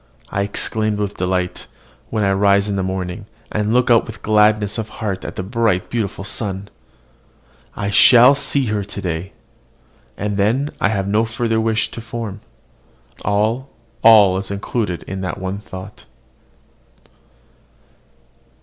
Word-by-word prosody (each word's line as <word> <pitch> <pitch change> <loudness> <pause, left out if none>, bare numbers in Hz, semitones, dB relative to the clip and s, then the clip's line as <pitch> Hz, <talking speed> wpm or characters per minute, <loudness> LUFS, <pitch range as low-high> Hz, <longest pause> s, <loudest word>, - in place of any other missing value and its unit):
I 100 - -1
exclaim 110 +1 0
with 105 -1 -3
delight, 90 0 -2 0.4
when 110 -2 -1
I 100 - +2
rise 100 +1 +3
in 100 - -1
the 95 - -1
morning, 95 +1 -4 0.2
and 105 0 -1
look 125 +1 +3
out 115 - +4
with 110 -2 -10
gladness 105 0 +3
of 110 -1 -4
heart 100 -4 -3
at - - -6
the 95 - -4
bright, 105 -2 0
beautiful 105 -4 -2
sun. 100 -1 -3 1.1
"I 100 0 -2
shall 125 +5 +7
see 140 -1 0
her 105 -2 -1
today!" 95 -2 -5 0.9
And 105 0 -2
then 120 +9 +1
I - - +4
have 100 -3 -1
no 105 +3 +2
further 115 0 -1
wish 110 -1 0
to 115 - -7
form: 115 -3 -6 0.8
all, 110 +6 0 0.3
all 105 -4 +7
is 95 - -6
included 100 -2 -3
in 95 0 -6
that 90 -4 -3
one 95 +2 -4
thought. 95 0 -10
105 Hz, 140 wpm, -19 LUFS, 95-110 Hz, 1.1 s, shall